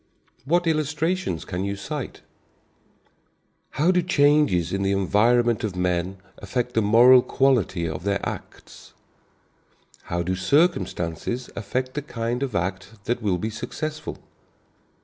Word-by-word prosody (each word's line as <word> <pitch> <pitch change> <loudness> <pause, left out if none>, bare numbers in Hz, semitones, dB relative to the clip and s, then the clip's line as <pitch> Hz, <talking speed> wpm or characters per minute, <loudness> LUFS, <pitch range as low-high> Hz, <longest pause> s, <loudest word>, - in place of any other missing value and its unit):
What 175 +5 +2
illustrations 155 - -1
can 90 0 -3
you 100 0 -2
cite? 100 0 -6 1.6
How 160 +6 +4
do 180 -1 +2
changes 145 - +3
in 95 - -1
the 100 0 +1
environment 115 +5 +2
of 105 -4 -2
men 90 +1 -1 0.2
affect 120 +5 -3
the 110 - +2
moral 120 +5 +7
quality 120 -12 +1
of 80 +1 -5
their 100 0 0
acts? - - -9 1.1
How 85 0 -2
do 90 +2 -1
circumstances 100 - 0
affect 130 +4 -3
the 150 - -3
kind 120 -2 -3
of 130 -6 -3
act 95 +4 -4
that 120 +1 -1
will 100 -4 +1
be 110 +5 -3
successful? 155 +8 -5
115 Hz, 130 wpm, -24 LUFS, 95-140 Hz, 1.6 s, moral